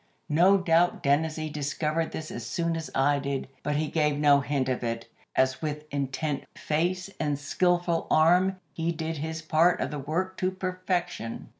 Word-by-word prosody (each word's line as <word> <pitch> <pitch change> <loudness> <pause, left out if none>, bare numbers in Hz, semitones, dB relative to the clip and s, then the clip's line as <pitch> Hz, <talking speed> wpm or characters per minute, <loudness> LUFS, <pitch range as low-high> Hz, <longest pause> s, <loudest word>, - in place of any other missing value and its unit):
No 180 +6 +5
doubt 175 -1 +2
Dennazee 155 +2 +1
discovered 150 +2 -1
this 155 0 -6
as 120 - -5
soon 165 +8 -1
as 160 -1 -4
I 140 +2 +3
did, 140 -1 -3
but 150 - -1
he 155 +1 0
gave 150 -2 +1
no 145 -1 +5
hint 140 -2 -1
of 130 -1 -1
it, 115 0 -3 0.3
as 130 0 +2
with 150 -1 -3
intent 140 +1 -2
face 180 +5 -1
and 145 -2 0
skilful 175 +3 +1
arm 180 +4 +4
he 165 +2 -1
did 160 -1 -3
his 160 +2 -4
part 160 +3 +3
of - - -2
the 150 - -4
work 175 +7 -2
to 185 - +1
perfection. 185 -7 -3
155 Hz, 170 wpm, -27 LUFS, 145-175 Hz, 0.3 s, No